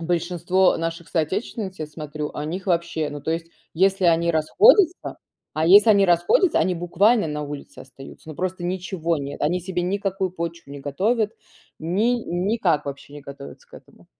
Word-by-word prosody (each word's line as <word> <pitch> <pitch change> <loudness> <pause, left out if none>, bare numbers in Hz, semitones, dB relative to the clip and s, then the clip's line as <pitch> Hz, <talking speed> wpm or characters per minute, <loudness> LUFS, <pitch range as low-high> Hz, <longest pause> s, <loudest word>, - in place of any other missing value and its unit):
большинство 175 +2 +1
наших, 165 0 -5
соотечественниц, 190 +4 -3
я 155 - -4
смотрю, 150 -1 -6
о 150 - -4
них 180 +5 -5
вообще, 170 -4 -1
ну, 145 - -7
то 150 - -4
есть, 165 0 -2 0.3
если 190 +1 +2
они 170 0 +3
расходятся, 365 - +3 0.3
а, 155 +1 0
если 205 +5 +7
они 200 -2 +5
расходятся, 175 - +3
они 185 - +1
буквально 200 +5 +2
на 150 -1 -4
улице 145 -1 -8
остаются, 135 +3 -13
но - - -8
просто 185 0 -3
ничего 175 -2 -2
нет. 140 +1 -6
Они 175 +5 +1
себе 180 0 -3
никакую 190 0 -2
почву 170 -3 -6
не 140 - -8
готовят, 210 - 0 0.5
ни 200 +9 +1
никак 175 -4 0
вообще 140 +1 -8
не 145 - -9
готовятся 140 0 -11
к - - -16
этому. - - -17
175 Hz, 170 wpm, -23 LUFS, 155-190 Hz, 0.5 s, если